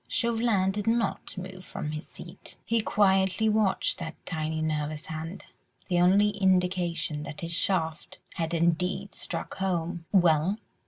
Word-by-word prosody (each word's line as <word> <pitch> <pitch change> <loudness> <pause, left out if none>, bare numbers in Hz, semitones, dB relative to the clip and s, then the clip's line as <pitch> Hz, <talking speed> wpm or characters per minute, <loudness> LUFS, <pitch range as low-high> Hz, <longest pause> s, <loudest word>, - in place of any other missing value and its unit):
Chauvelin 225 -5 +2
did 205 +1 -4
not 230 -3 0
move 185 0 -7
from 150 - -5
his 155 +1 -6
seat; - - -11
he 230 -1 +2
quietly 195 0 +3
watched 215 -4 +1
that 165 -2 -5
tiny 160 -1 -2
nervous 155 -1 -2
hand, 160 +4 -6 0.4
the 175 -1 +3
only 195 +4 +5
indication 180 -5 +1
that 150 - -7
his 170 0 -2
shaft 175 0 0 0.2
had 165 -1 -2
indeed 175 +4 0
struck - - -5
home. 175 -2 -2
"Well?" 175 0 +4
180 Hz, 140 wpm, -28 LUFS, 160-195 Hz, 0.4 s, only